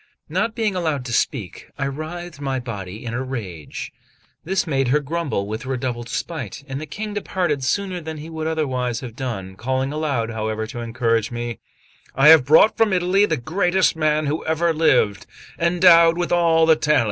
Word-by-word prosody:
Not 230 -1 -1
being 215 -4 0
allowed 155 -7 -1
to 120 - -4
speak, 110 -4 -2
I 135 - -1
writhed 155 +3 -6
my 135 -2 -1
body 105 -3 -7
in 115 - -4
a 125 - -2
rage; 105 - -6 0.5
this 190 +3 0
made 135 -5 0
her 140 +4 +3
grumble 150 -7 -2
with 110 +5 -5
redoubled 125 -2 -3
spite; 140 - -5
and 135 +1 -5
the 155 - -6
King 210 +8 -5
departed 180 -8 -1
sooner 185 +4 -1
than 160 0 -6
he 150 +1 -8
would 160 -1 -4
otherwise 130 -7 -1
have 120 -4 -8
done, 105 -8 -5
calling 130 +5 -2
aloud, 140 -7 -1
however, 110 0 -3
to 115 +2 -7
encourage 115 -1 0
me: 120 -1 -5 0.6
"I 135 +3 +6
have 160 -5 +8
brought 160 +9 +5
from 220 -3 +3
Italy 185 +3 +3
the 160 - 0
greatest 180 +8 +1
man 155 -1 +1
who 150 +2 -2
ever 160 +1 +1
lived, 130 -10 +2 0.3
endowed 170 -1 +5
with 175 -1 -2
all 165 -2 +4
the 160 -1 +6
talents." 150 -1 +2
145 Hz, 180 wpm, -21 LUFS, 120-165 Hz, 0.6 s, have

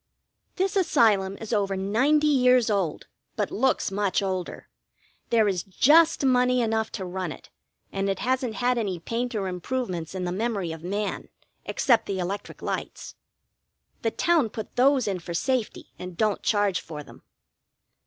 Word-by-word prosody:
This 385 +2 0
Asylum 210 - +3
is 225 +1 -5
over 195 -2 0
ninety 255 +11 +2
(90) - - +4
years 250 -4 +4
old, 190 -7 -1 0.3
but 210 -2 -1
looks 260 -2 +1
much 200 0 0
older. 185 -2 -4 0.6
There 225 -3 +4
is 185 -3 0
just 295 - +4
money 250 -1 +3
enough 220 -1 0
to 190 - -4
run 180 -2 -4
it, - - -12 0.4
and 195 0 -1
it 195 - 0
hasn't 255 -1 -1
had 245 0 +1
any 195 -5 -2
paint 235 +7 -3
or 200 -3 -1
improvements 180 -2 -4
in 185 - -3
the 175 - -2
memory 200 -3 -2
of 160 -1 -7
man, 200 +3 -3 0.4
except 240 -5 +2
the 195 - -2
electric 185 +3 -5
lights. - - -5 0.9
The 225 - +1
town 320 -1 +2
put 220 0 -7
those 260 -1 +3
in 190 -2 -1
for 170 0 -6
safety, 255 +4 -2
and 180 -1 -8
don't 215 -2 +1
charge 205 -3 +1
for 150 -2 -8
them. - - -15
210 Hz, 165 wpm, -26 LUFS, 190-250 Hz, 0.9 s, 90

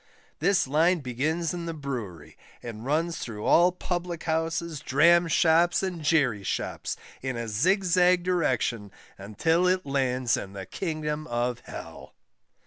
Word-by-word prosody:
This 195 -2 +2
Line 160 +5 +2
begins 150 +7 -2
in 170 -1 -5
the 165 - -4
Brewery, 120 - -6 0.3
and 115 -2 -7
runs 160 +5 -1
through 105 -3 -6
all 175 +2 +5
Public 175 -2 -4
houses, 165 -1 -2
Dram 170 +7 +4
shops, 165 +3 +3
and 180 -3 -3
Jerry 145 -9 +2
shops, 95 - -3 0.2
in 130 -2 -3
a 115 0 -4
zigzag 180 - +3
direction, 125 - 0 0.3
until 160 - +1
it 185 0 +1
lands 130 -3 0
in 95 - -7
the 95 -1 -7
Kingdom 155 -3 -4
of 120 0 -1
Hell. - - -10
155 Hz, 135 wpm, -27 LUFS, 125-175 Hz, 0.3 s, all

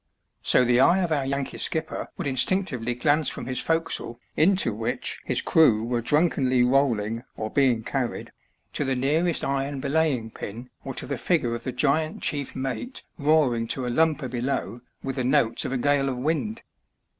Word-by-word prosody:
So 125 - +4
the 120 0 +3
eye 175 +7 +5
of 170 - -2
our 140 -3 0
Yankee 140 0 -3
skipper 160 - -2
would - - -4
in 140 - -1
stinctively 125 -6 0
glance 150 +2 +3
from - - -5
his 130 0 -3
forecastle 165 -7 -2 0.2
into 180 - +3
which 110 +2 -3
his - - +1
crew 115 -10 +4
were 120 0 -1
drunkenly 130 -2 +2
rolling 120 -4 +1
or 110 0 -4
being 125 -5 +2
carried, 130 0 -3 0.4
to - - -1
the 135 -1 0
nearest 155 +6 +1
iron 140 0 -2
belaying 135 -6 0
pin 120 +6 -8
or 135 -2 -6
to - - -2
the 140 -4 -4
figure 125 -3 +1
of 120 - -6
the 130 - -2
giant 155 +5 0
chief 145 -3 -2
mate 135 - -4 0.2
roaring 140 -6 +2
to 130 +2 -2
a 125 - -2
lumper 155 0 +1
below 125 0 -3 0.2
with 135 0 -4
the 130 - 0
notes 125 -2 +2
of - - -3
a 135 - 0
gale 140 +1 +2
of 130 - -3
wind. 160 - -2
135 Hz, 180 wpm, -25 LUFS, 120-150 Hz, 0.4 s, eye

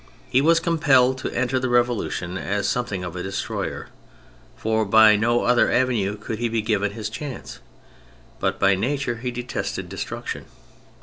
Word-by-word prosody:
He 130 - +4
was 165 +3 +4
compelled 135 -6 +3
to - - -3
enter 130 +1 0
the 130 0 -1
Revolution 120 -7 0
as 100 +1 -1
something 115 -7 -2
of 90 -1 -6
a 90 - -4
destroyer, 95 +1 -4 0.7
for 110 0 0
by 110 +1 +6
no 120 +3 +2
other 120 0 +3
avenue 110 -6 +1
could 105 +1 -5
he 120 -1 0
be 115 -1 -1
given 105 -2 0
his 110 -1 -4
chance; 130 - -7 0.8
but 95 0 0
by 100 0 +4
nature 120 +4 -1
he 125 +2 -4
detested 125 0 -4
destruction. - - -5
115 Hz, 160 wpm, -23 LUFS, 105-125 Hz, 0.8 s, by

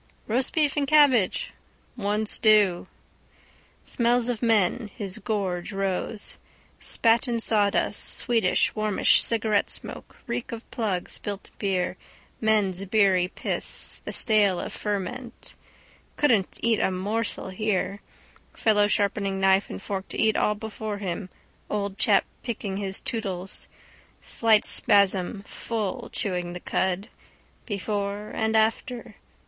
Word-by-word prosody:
—Roast 250 +4 0
beef 300 -3 +2
and 285 -2 0
cabbage. 290 - +4 0.4
—One 210 -1 -1
stew. 210 -4 +4 1.0
Smells 240 0 +1
of 240 -3 -2
men. 220 -1 +2
Spat 195 +3 -2
on 235 -1 -1
sawdust, 210 -3 +2
sweetish 225 -7 +2
warmish 215 -2 +3
cigarettesmoke, 220 -2 -1
reek 245 -2 -4
of 230 0 -8
plug, 200 -6 -2
spilt 205 -1 -5
beer, 185 -2 -1 0.4
men's 205 -4 +1
beery 190 -3 +3
piss, - - -3
the - - -5
stale 205 -5 +2
of - - -5
ferment. 230 +4 -4
His - - -11
gorge - - -32
rose. - - -30
Couldn't 225 -10 +2
eat 230 -2 +2
a - - +2
morsel 200 +2 -2
here. 200 0 -2 0.5
Fellow 210 -2 +3
sharpening 200 -2 0
knife 195 +1 +3
and - - -6
fork 195 -1 -5
to - - -7
eat 220 -1 +3
all 210 - +1
before 215 0 -5
him, 190 -1 -4 0.4
old 200 -1 -3
chap - - +3 0.2
picking 205 -5 -4
his 195 -1 -2
tootles. 195 -8 -4 0.5
Slight 220 -2 +3
spasm, 200 0 +3
full, 215 -2 -4
chewing 180 -3 -3
the 180 - -6
cud. 190 +4 -1 0.6
Before 205 0 -3
and 220 0 +1
after. 225 +2 -1
210 Hz, 120 wpm, -25 LUFS, 195-225 Hz, 1.0 s, cabbage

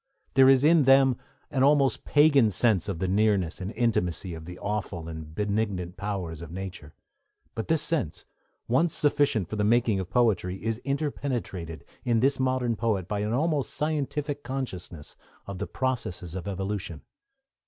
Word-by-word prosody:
There 135 0 +7
is 135 0 +5
in 155 -2 +5
them 135 -1 +6 0.4
an 130 - 0
almost 140 -3 +3
pagan 145 -6 +5
sense 105 -1 +1
of 95 - -2
the 95 +2 -1
nearness 100 -3 +1
and 95 +2 -4
intimacy 95 -6 0
of 80 -1 -8
the 90 +1 -8
awful 100 -5 -4
and 80 -1 -8
benignant 100 -3 -1
powers 90 -6 -4
of 85 - -8
nature; 90 -4 -7 0.6
but 115 - -4
this 160 -2 +2
sense, 140 - -2 0.4
once 145 +7 +2
sufficient 140 - +2
for 110 - -5
the 105 - +1
making 115 -2 +3
of 95 -1 -5
poetry, 100 -6 +2
is 115 +3 -3
interpenetrated, 130 - -3 0.2
in 120 -3 +2
this 135 +3 +2
modern 130 -2 +1
poet, 105 -5 -1
by 105 0 -2
an 105 +1 -1
almost 145 +2 0
scientific 150 -1 -2
consciousness 95 - -6 0.3
of 100 -2 -7
the - - -3
processes 120 -10 -3
of 95 +1 -5
evolution. 95 -4 -4
110 Hz, 160 wpm, -27 LUFS, 90-135 Hz, 0.6 s, There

